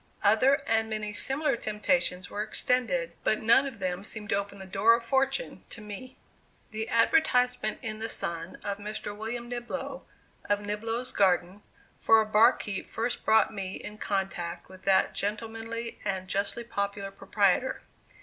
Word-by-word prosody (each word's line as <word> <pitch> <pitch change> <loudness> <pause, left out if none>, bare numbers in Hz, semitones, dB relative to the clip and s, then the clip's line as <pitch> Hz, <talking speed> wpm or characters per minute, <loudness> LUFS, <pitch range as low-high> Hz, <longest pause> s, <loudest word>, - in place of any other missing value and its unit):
Other 225 +7 +4
and 225 0 +1
many 215 -1 -3
similar 270 +5 +1
temptations 210 -4 0
were 205 - -4
extended, 210 -6 +1
but 215 - +1
none 235 +5 +5
of 260 -4 -7
them 185 -1 -3
seemed 215 0 -3
to - - +2
open 200 0 -3
the 190 - -9
door 200 +5 +4
of 235 0 -5
fortune 270 - 0
to - - -7
me. 210 +5 -9 0.5
The 220 +1 -3
advertisement 250 -3 +3
in 215 -2 -4
the 225 +1 -3
Sun, 170 -3 -2
of 200 0 -3
Mr. 210 0 -5
William 235 +3 -5
Niblo, 240 0 -5 0.5
of 205 0 +2
Niblo's 225 +4 -2
Garden, 185 0 +2 0.4
for 225 0 +6
a 220 - +2
barkeeper 215 -2 +3
first 235 +2 -2
brought 220 0 +4
me 195 -2 -4
in 210 0 -8
contact 195 -4 -3
with 185 0 -14
that 190 -1 +4
gentlemanly 225 +2 -3
and 190 -1 -2
justly 200 +5 -1
popular 200 -3 -3
proprietor. 200 +5 +1
215 Hz, 155 wpm, -28 LUFS, 200-230 Hz, 0.5 s, for